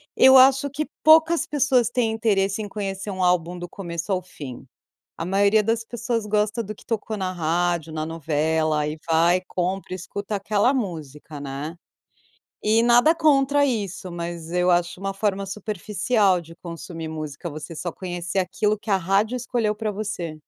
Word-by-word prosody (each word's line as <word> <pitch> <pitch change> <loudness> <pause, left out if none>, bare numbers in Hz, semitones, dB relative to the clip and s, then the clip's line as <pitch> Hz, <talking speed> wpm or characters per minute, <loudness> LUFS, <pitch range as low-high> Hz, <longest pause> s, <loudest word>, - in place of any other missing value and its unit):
Eu 265 0 +8
acho 270 +2 +6
que 295 +2 -3 0.2
poucas 320 +1 +6
pessoas 275 -7 +2
têm 230 -3 0
interesse 205 -2 +1
em 205 - -5
conhecer 195 0 -4
um 190 -1 -4
álbum 180 -1 +1
do 175 - -6
começo 175 0 -5
ao 185 - 0
fim. 140 -8 -9 0.5
A 165 - -4
maioria 200 +3 +3
das 225 +1 0
pessoas 230 -1 -3
gosta 210 +2 0
do 215 +2 -6
que - - -18
tocou 220 -1 -3
na 190 -2 -2
rádio, 170 -1 -1
na 155 0 -3
novela 155 -1 0
e 155 +1 -5
vai, 170 +3 +4
compra, 185 +1 -3
e - - -2
escuta 200 +3 -5
aquela 210 +6 +1
música, 155 - -5
né. 140 +4 -5 0.9
E 220 +2 +3
nada 240 +7 +5
contra 285 -2 +3
isso, 200 -7 -2
mas 170 -1 -6
eu 180 +1 +1
acho 175 0 +1
uma 195 +1 -3
forma 195 -1 -1
superficial 210 -1 0
de 165 0 -14
consumir 165 -1 -7
música, 155 +1 -6
você 155 +2 -8
só 175 +1 -4
conhecer 175 0 -4
aquilo 210 +3 0
que 210 +1 -7
a 195 - +5
rádio 195 +7 +1
escolheu 235 -3 -1
pra 215 -1 -2
você. 195 -6 -4
195 Hz, 170 wpm, -23 LUFS, 170-220 Hz, 0.9 s, Eu